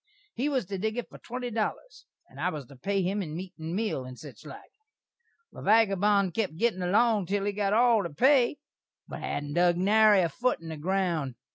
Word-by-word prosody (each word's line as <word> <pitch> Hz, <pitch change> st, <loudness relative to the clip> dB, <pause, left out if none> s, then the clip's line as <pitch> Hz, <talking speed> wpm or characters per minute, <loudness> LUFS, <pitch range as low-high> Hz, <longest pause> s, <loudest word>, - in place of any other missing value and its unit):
He 275 Hz, +5 st, -1 dB
was 265 Hz, -7 st, -1 dB
to 195 Hz, +1 st, -5 dB
dig 220 Hz, +3 st, -2 dB
it 245 Hz, -, -3 dB
for -, -, -12 dB
twenty 245 Hz, 0 st, -6 dB
dollers, 230 Hz, -, -4 dB, 0.2 s
and 135 Hz, -, -15 dB
I 180 Hz, -, +1 dB
was 150 Hz, -6 st, -6 dB
to 140 Hz, -, -15 dB
pay 195 Hz, +9 st, -1 dB
him 195 Hz, +3 st, -1 dB
in 155 Hz, -4 st, -6 dB
meat 180 Hz, +1 st, -7 dB
and 160 Hz, +2 st, -4 dB
meal, 210 Hz, -10 st, -2 dB
and 130 Hz, 0 st, -10 dB
sich 140 Hz, -4 st, -12 dB
like. 140 Hz, -, -12 dB, 0.8 s
The -, -, -11 dB
vagabon 200 Hz, -2 st, +3 dB
kep 190 Hz, -2 st, -2 dB
gittin' 210 Hz, 0 st, 0 dB
along 210 Hz, +1 st, +2 dB
til 200 Hz, +1 st, -1 dB
he 205 Hz, -, 0 dB
got 200 Hz, 0 st, -1 dB
all 235 Hz, -1 st, +4 dB
the 170 Hz, -, -4 dB
pay, 260 Hz, -, +3 dB, 0.5 s
but -, -, -7 dB
hadn't 145 Hz, 0 st, -4 dB
dug 175 Hz, +1 st, +3 dB
nary 210 Hz, +1 st, +5 dB
a 170 Hz, -, 0 dB
foot 250 Hz, +8 st, -1 dB
in 165 Hz, 0 st, -9 dB
the 160 Hz, -, -6 dB
ground. 170 Hz, -5 st, -1 dB
195 Hz, 215 wpm, -28 LUFS, 165-220 Hz, 0.8 s, nary